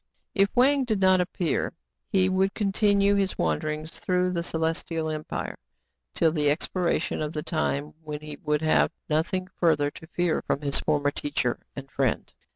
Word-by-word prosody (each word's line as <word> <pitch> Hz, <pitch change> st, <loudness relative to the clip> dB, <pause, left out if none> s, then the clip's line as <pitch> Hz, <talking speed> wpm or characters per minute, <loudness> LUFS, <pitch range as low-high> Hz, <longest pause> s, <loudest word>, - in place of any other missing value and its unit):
If 195 Hz, 0 st, +3 dB
Wang 270 Hz, +3 st, +4 dB
did 220 Hz, -5 st, -1 dB
not 185 Hz, -1 st, +5 dB
appear, 180 Hz, -2 st, -1 dB, 0.3 s
he 185 Hz, -1 st, +3 dB
would 190 Hz, +1 st, +1 dB
continue 200 Hz, -1 st, +3 dB
his 195 Hz, -2 st, 0 dB
wanderings 155 Hz, 0 st, -1 dB
through 180 Hz, +1 st, 0 dB
the 170 Hz, -2 st, -1 dB
Celestial 160 Hz, -1 st, -1 dB
Empire 155 Hz, 0 st, -4 dB, 0.6 s
till 160 Hz, -, +3 dB
the 150 Hz, -2 st, +2 dB
expiration 170 Hz, +4 st, 0 dB
of 150 Hz, 0 st, -3 dB
the 150 Hz, -, -3 dB
time 150 Hz, -3 st, -1 dB
when 150 Hz, -1 st, -6 dB
he 150 Hz, -1 st, -8 dB
would 150 Hz, 0 st, 0 dB
have 155 Hz, -, +4 dB, 0.2 s
nothing 185 Hz, +4 st, 0 dB
further 150 Hz, -4 st, +3 dB
to 160 Hz, -, -12 dB
fear 175 Hz, -1 st, 0 dB
from 140 Hz, -, -2 dB
his 140 Hz, -1 st, +3 dB
former 145 Hz, -2 st, +1 dB
teacher 135 Hz, -4 st, -1 dB, 0.2 s
and 140 Hz, 0 st, -8 dB
friend. 130 Hz, -4 st, -1 dB
160 Hz, 160 wpm, -26 LUFS, 150-185 Hz, 0.6 s, not